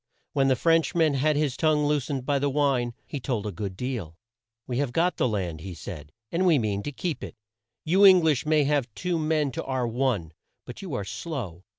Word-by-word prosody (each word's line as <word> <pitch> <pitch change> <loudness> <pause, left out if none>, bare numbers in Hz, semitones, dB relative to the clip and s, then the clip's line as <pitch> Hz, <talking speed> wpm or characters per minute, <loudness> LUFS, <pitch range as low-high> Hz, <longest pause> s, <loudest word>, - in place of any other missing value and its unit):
When 135 -2 +3
the 130 - +4
French 165 +5 +2
man 160 -3 +3
had 150 +3 +2
his 145 -3 0
tongue 155 -2 +2
loosed 145 -3 -1
by 140 -1 +1
the 140 +1 +1
wine, 135 -4 +1
he 145 - -5
told 120 -5 -2
a 105 - -2
good 95 +1 -5
deal. 110 -11 -4 0.5
"We 125 0 -2
have 140 -4 -1
got 175 +4 +1
the - - +2
land," 90 -8 -3
he 95 0 -7
said, 75 -4 -8 0.2
"and 185 +2 +1
we 165 -4 +5
mean 105 -5 -1
to 145 - -5
keep 155 +5 -4
it. - - -7 0.5
You 185 +6 +4
Eng 185 -3 +8
lish 150 -5 +2
may 155 -1 +3
have 140 -4 0
two 175 -2 -1
men 155 -2 +1
to - - -4
our 130 -2 -1
one, 115 -9 -1 0.3
but 125 - -9
you 180 -9 -5
are 100 - -3
slow. 100 - -6
135 Hz, 220 wpm, -26 LUFS, 115-155 Hz, 0.5 s, Eng